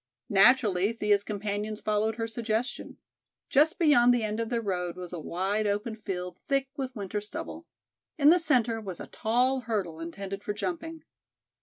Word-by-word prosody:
Naturally 205 -2 +5
Thea's 210 -3 +2
companions 210 +1 -3
followed 215 +1 0
her 225 0 -2
suggestion. 225 +1 -3 0.5
Just 310 +3 +4
beyond 285 -7 +5
the 245 -2 +2
end 215 +1 -2
of 230 -1 -2
their 235 - 0
road 180 -5 -2
was 180 -1 -7
a 175 - -4
wide 195 +7 -1
open 210 +2 -1
field 180 -4 -5
thick 275 -1 +1
with 265 -2 -4
winter 205 0 -3
stubble. 310 +10 -7 0.5
In 295 0 +7
the 355 - +5
centre 245 -8 +2
was 190 -5 -7
a - - -6
tall 250 +4 +1
hurdle 205 -9 -3
intended 195 +4 -6
for 210 - -2
jumping. 325 - -4
215 Hz, 165 wpm, -28 LUFS, 200-250 Hz, 0.5 s, In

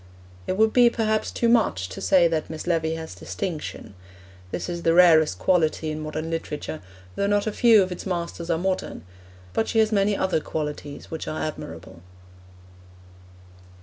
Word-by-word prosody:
It 185 - -1
would 220 +1 +3
be, 245 -1 +6
perhaps, 220 -2 0
too 235 - 0
much 220 - +2
to - - -8
say 180 -3 +4
that 160 -2 -2
Miss 160 -1 -6
Levy 160 -2 0
has 160 0 -7
distinction; 160 - -6 0.6
this - - -4
is 170 -1 -4
the 165 0 +2
rarest 160 - +6
quality 160 - +1
in 155 - -4
modern 155 +1 -4
literature, 155 -1 -4 0.3
though 200 - 0
not 205 0 +1
a 215 - -1
few 225 -2 +5
of 185 - -5
its 180 - -6
masters 170 -1 -4
are 165 - +2
modern; 185 - -3 0.5
but 220 - 0
she - - -2
has 220 0 +4
many 200 -1 +2
other 190 -4 +1
qualities 150 -2 -6
which 160 - -5
are 155 - -3
admirable. 90 - -7
170 Hz, 170 wpm, -24 LUFS, 155-200 Hz, 0.6 s, be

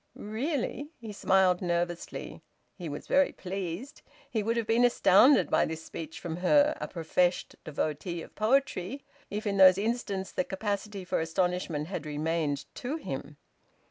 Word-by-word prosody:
"Really!" 275 +5 -3
He 225 -3 -7
smiled 190 -2 +3
nervously. 175 -1 -3 0.3
He 175 -4 -6
was 145 - -6
very 280 0 +3
pleased. 190 - -5 0.3
He 220 - 0
would 230 +3 0
have 230 - 0
been 225 +2 +3
astounded 245 +2 +5
by - - +4
this 160 0 -6
speech 160 -1 -7
from 165 -1 -5
her, 290 +11 +4
a - - -2
professed 175 +1 0
devotee 155 +3 -3
of - - -14
poetry, 245 0 0 0.3
if 210 +2 -4
in 200 -1 0
those 185 -1 +8
instants 205 -3 -2
the - - 0
capacity 200 0 -3
for - - 0
astonishment 165 -2 -1
had 160 -3 -5
remained 150 -1 -1
to 265 +4 -4
him. 145 - -6
190 Hz, 150 wpm, -29 LUFS, 165-225 Hz, 0.3 s, those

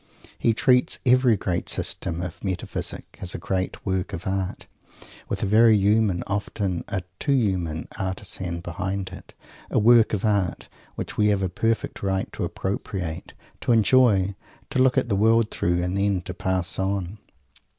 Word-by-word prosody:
He 115 - +2
treats 125 +1 +3
every 125 -3 +5
great 90 -2 -2
System 85 +1 0
of 90 -3 -7
Metaphysic 95 -3 -4
as 90 - -2
a - - -2
great 95 +1 -3
work 95 -2 -1
of 85 - -5
Art 95 -1 -2 0.6
with - - -2
a - - +2
very 110 +2 +6
human, 100 -2 +2
often 100 -2 -2
a 95 -3 -3 0.2
too 140 - +1
human, 90 - 0
artizan 95 -2 -3
behind 95 +3 -4
it - - -12 0.4
a - - 0
work 115 +1 +5
of 105 +1 0
Art 100 -5 0 0.3
which - - -5
we 105 - +4
have 100 -2 +2
a 95 - 0
perfect 115 +5 -1
right 95 -1 -1
to - - -3
appropriate, 95 -4 -4 0.2
to - - -1
enjoy, 110 -4 +4 0.4
to - - 0
look 130 0 +4
at 130 - +2
the 105 - +1
world 110 +2 +3
through, 85 0 0
and 90 +1 -2
then 100 -2 +1
_to 90 - -6
pass 95 -1 -1
on! 95 +1 -2
95 Hz, 165 wpm, -24 LUFS, 90-110 Hz, 0.6 s, very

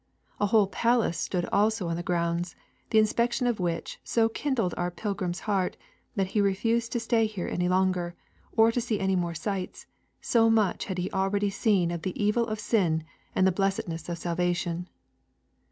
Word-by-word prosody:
A 205 - +2
whole 210 0 +5
palace 230 -3 +1
stood 175 -2 -1
also 210 -2 +2
on 165 - -1
the 170 - -3
grounds, 170 0 -1 0.3
the 220 - +2
inspection 235 +3 +2
of 240 -4 +1
which 170 -2 -2
so 225 -1 +2
kindled 230 -6 -1
our 175 0 -1
pilgrim's 185 -2 -3
heart, 195 -4 0 0.4
that 195 -2 0
he 210 - +1
refused 225 +4 +1
to 240 - +1
stay 225 -1 +2
here 205 -5 -5
any 180 0 0
longer, 185 -2 +1 0.4
or 225 +1 +6
to 245 - 0
see 230 -3 -1
any 190 0 +1
more 170 -2 -1
sights 190 +3 -4 0.3
so 225 -1 +3
much 220 -4 +2
had 190 -3 -4
he 180 +1 -2
already 200 +1 +1
seen 195 -4 +2
of 170 -1 -4
the 185 0 -4
evil 210 +3 +2
of 215 -1 -3
sin 180 -8 +1 0.3
and 190 - +4
of 190 - +2
the - - -20
blessedness 185 -4 -1
of 170 - -3
salvation. 175 0 -1
195 Hz, 185 wpm, -28 LUFS, 175-220 Hz, 0.4 s, or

